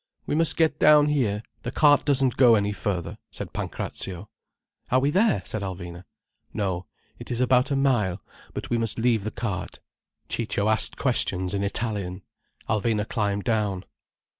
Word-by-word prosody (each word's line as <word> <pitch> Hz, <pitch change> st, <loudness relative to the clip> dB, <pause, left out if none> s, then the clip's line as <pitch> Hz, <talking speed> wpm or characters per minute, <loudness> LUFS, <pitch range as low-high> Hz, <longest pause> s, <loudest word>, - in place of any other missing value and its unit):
"We -, -, -2 dB
must 165 Hz, +1 st, +1 dB
get 160 Hz, -2 st, +2 dB
down 150 Hz, -1 st, +6 dB
here—the 120 Hz, -3 st, -2 dB
cart 145 Hz, -2 st, +5 dB
doesn't 135 Hz, -3 st, +2 dB
go 120 Hz, -3 st, +6 dB
any 105 Hz, -1 st, +1 dB
further," 95 Hz, -4 st, -3 dB
said -, -, -8 dB
Pancrazio. 95 Hz, +2 st, -5 dB, 0.6 s
"Are 130 Hz, -, +4 dB
we 140 Hz, +2 st, +1 dB
there?" 205 Hz, +5 st, +2 dB
said 110 Hz, -, -3 dB
Alvina. 90 Hz, -2 st, -6 dB, 0.5 s
"No, 95 Hz, -3 st, -2 dB, 0.3 s
it -, -, -9 dB
is 120 Hz, -, -2 dB
about 125 Hz, 0 st, +3 dB
a 140 Hz, -, 0 dB
mile. 120 Hz, -9 st, +1 dB, 0.4 s
But -, -, -5 dB
we 120 Hz, -, +2 dB
must 115 Hz, -2 st, -2 dB
leave 115 Hz, -3 st, +2 dB
the 110 Hz, -, -2 dB
cart." 105 Hz, -5 st, -5 dB, 0.5 s
Ciccio 110 Hz, -2 st, -1 dB
asked 110 Hz, -, 0 dB
questions 95 Hz, -8 st, +1 dB
in 100 Hz, 0 st, -1 dB
Italian. 100 Hz, -3 st, -1 dB, 0.4 s
Alvina 110 Hz, 0 st, 0 dB
climbed 100 Hz, -3 st, -1 dB
down. 105 Hz, -5 st, 0 dB
110 Hz, 155 wpm, -25 LUFS, 100-130 Hz, 0.6 s, down